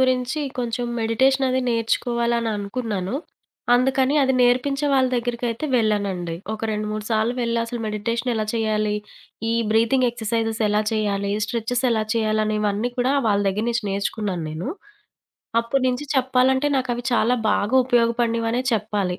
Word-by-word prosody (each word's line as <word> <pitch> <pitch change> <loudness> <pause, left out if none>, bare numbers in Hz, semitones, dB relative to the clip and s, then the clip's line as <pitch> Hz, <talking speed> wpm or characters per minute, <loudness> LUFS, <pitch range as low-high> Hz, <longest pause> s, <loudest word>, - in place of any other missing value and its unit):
గురించి 255 +3 +1 0.2
కొంచెం 240 0 -2
మెడిటేషనది 260 +3 +2
నేర్చుకోవాలననుకున్నాను. 230 -3 -1 0.6
అందుకని 265 +2 +2
అది 265 0 +2
నేర్పించే 265 +4 +2
వాళ్ళ 260 -1 +4
దెగ్గరకైతే 240 +2 -2
వెళ్ళానండి. 200 -6 0 0.2
ఒక 220 - -5
రెండు, 210 0 -2
మూడు 215 0 -4
సార్లు 220 +2 +1
వెళ్లి 235 -1 0
అసలు 235 +1 -5
మెడిటేషనేలా 225 +2 -1
చేయాలి? 215 -2 0 0.5
ఈ - - +1 0.2
బ్రీతింగ్ 230 +3 +3
ఎక్సర్సైజెస్ 225 -1 -2
ఎలా 210 +1 +2
చేయాలి? 200 -2 0
స్ట్రెచెస్ 240 +3 -2
ఎలా 220 -2 +1
చేయాలని, 215 -1 +1
ఇవన్నీ 210 +3 0
కూడా 255 +3 +2
వాళ్ళ 205 -2 +3
దెగ్గర 210 +4 -1
నుంచి 230 -2 -1
నేర్చుకున్నాను 195 -3 -2
నేను. 160 - -5 0.9
అప్పడు 255 +3 -1
నుంచి 250 +3 -2
చెప్పాలంటే, 260 +1 +2
నాకవి 245 -2 -2
చాలా 240 +1 +3 0.2
బాగూపయోగపడినవనే 235 0 +2
చెప్పాలి. 205 -4 -1
230 Hz, 125 wpm, -22 LUFS, 215-250 Hz, 0.9 s, వాళ్ళ